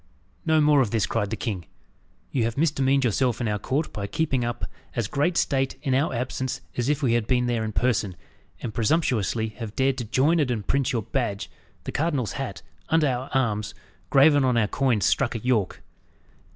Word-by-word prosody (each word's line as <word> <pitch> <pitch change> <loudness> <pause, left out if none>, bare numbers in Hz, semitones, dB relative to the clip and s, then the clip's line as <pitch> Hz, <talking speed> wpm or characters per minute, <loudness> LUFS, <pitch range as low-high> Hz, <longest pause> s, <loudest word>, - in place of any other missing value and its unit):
"No 160 -1 +4
more 150 -2 +5
of 120 - +1
this!" 110 -1 +1
cried 105 -3 -1
the 110 - -2
king. 95 - -4 0.6
"You 125 - +1
have 115 +2 -3
misdemeaned 140 -3 +2
yourself 120 +1 +1
in 120 - -1
our 105 -1 -1
court 140 +9 -2
by 100 -1 -4
keeping 135 -1 0
up 120 -4 -3 0.3
as 115 -4 0
great 150 +9 0
state 135 -1 +1
in 135 -4 0
our 140 +4 +2
absence 130 +1 -3
as 120 +2 -1
if 150 0 0
we 120 -3 +3
had 115 -2 +1
been 125 -1 +2
there 120 -2 0
in 110 - -3
person, 110 -5 0 0.5
and 115 - -4
presumptuously 115 - +1
have 115 -2 -6
dared 135 0 +1
to 120 - -3
join 145 +9 +2
and 145 -4 +1
imprint 120 +4 0
your 115 -4 -1
badge, 100 -4 -2 0.3
the - - -5
cardinal's 145 -7 0
hat, 110 - -5 0.3
under 160 -2 +3
our 130 0 -2
arms, 105 -5 0 0.3
graven 145 +1 +5
on 125 -2 +2
our 110 -3 +3
coins 120 -4 +1
struck 120 - +1
at 115 - -5
York. 110 -7 0
125 Hz, 195 wpm, -25 LUFS, 110-135 Hz, 0.6 s, more